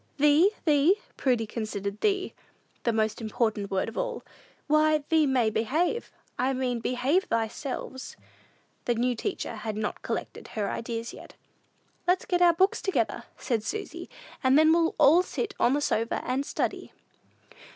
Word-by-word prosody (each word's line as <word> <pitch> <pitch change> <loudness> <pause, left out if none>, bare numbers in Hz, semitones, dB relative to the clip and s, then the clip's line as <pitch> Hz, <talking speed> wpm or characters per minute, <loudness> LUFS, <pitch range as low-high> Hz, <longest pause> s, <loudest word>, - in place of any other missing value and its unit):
"Thee? 295 +6 +5 0.2
thee?" 305 +4 +5 0.2
Prudy 245 -4 +1
considered 210 -2 -4
"thee" 390 -2 +1 0.5
the 235 - +3
most 220 0 0
important 215 -2 -1
word 190 -1 0
of 225 - -7
all. - - -3 0.4
"Why, 305 0 +3
thee 315 -2 +4
may 250 -5 +2
behave; 315 - 0 0.3
I 260 +2 +2
mean, 255 -2 -1
behave 255 +10 0
thyselves." 255 +3 -3 0.7
The 240 - +1
new 245 +2 +1
teacher 240 - -4
had 215 0 -4
not 215 -1 -3
collected - - -5
her 205 -2 0
ideas 230 0 -4
yet. - - -12 0.7
"Let's 360 +1 +2
get 355 -1 0
our 345 -1 +7
books 380 +4 +2
together," 385 - -1
said 230 -5 -1
Susy, 415 - -5 0.3
"and 260 +2 +5
then 315 +1 +6
we'll 335 -1 +2
all 325 +6 +6
sit 405 +3 -4
on 245 - +4
the 290 - +1
sofa 230 -4 0
and 265 +3 -1
study." - - -2
260 Hz, 150 wpm, -27 LUFS, 225-320 Hz, 0.7 s, our